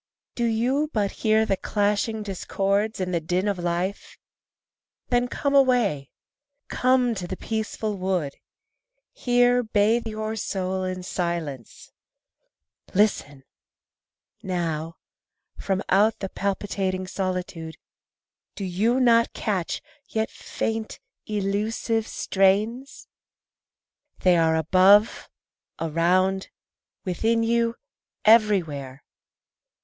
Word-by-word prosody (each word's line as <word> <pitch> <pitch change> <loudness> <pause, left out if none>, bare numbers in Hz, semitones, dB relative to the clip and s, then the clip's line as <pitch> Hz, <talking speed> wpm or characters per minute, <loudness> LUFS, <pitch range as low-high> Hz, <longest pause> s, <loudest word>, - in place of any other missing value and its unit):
Do 240 - -1
you 250 +7 +1
but 205 -3 0
hear 220 0 +2
the 195 - +1
clashing 210 +2 0
discords 200 +2 -1
and 185 -1 -2
the 170 - +2
din 180 +5 -1
of 200 -3 -1
life? 175 +3 -3 0.9
Then 245 0 +2
come 280 +3 -2
away, 245 - +3 0.6
come 255 -1 +2
to 185 -5 -5
the 185 +1 -5
peaceful 220 -1 -3
wood, 185 -7 -1 0.8
Here 245 0 +3
bathe 220 +1 +1
your 215 0 -4
soul 190 -3 -2
in 185 0 -4
silence. 170 - -4 1.0
Listen! 145 -9 +1 1.0
Now, 165 -3 -3 0.6
From 195 0 -1
out 210 +3 +3
the 195 - -5
palpitating 195 -1 -2
solitude 185 -4 -4 0.8
Do 200 - -4
you 215 +8 +1
not 230 -2 +4
catch, 195 -6 -2 0.3
yet 220 0 -1
faint, 225 -1 -4 0.3
elusive 215 +2 -1
strains? 210 +7 0 1.1
They 180 -1 +5
are 165 -1 +3
above, 190 +7 +4 0.5
around, 180 +4 +1 0.6
within 225 +5 +1
you, 230 0 +1 0.5
everywhere. 170 - +3
200 Hz, 95 wpm, -24 LUFS, 180-225 Hz, 1.1 s, They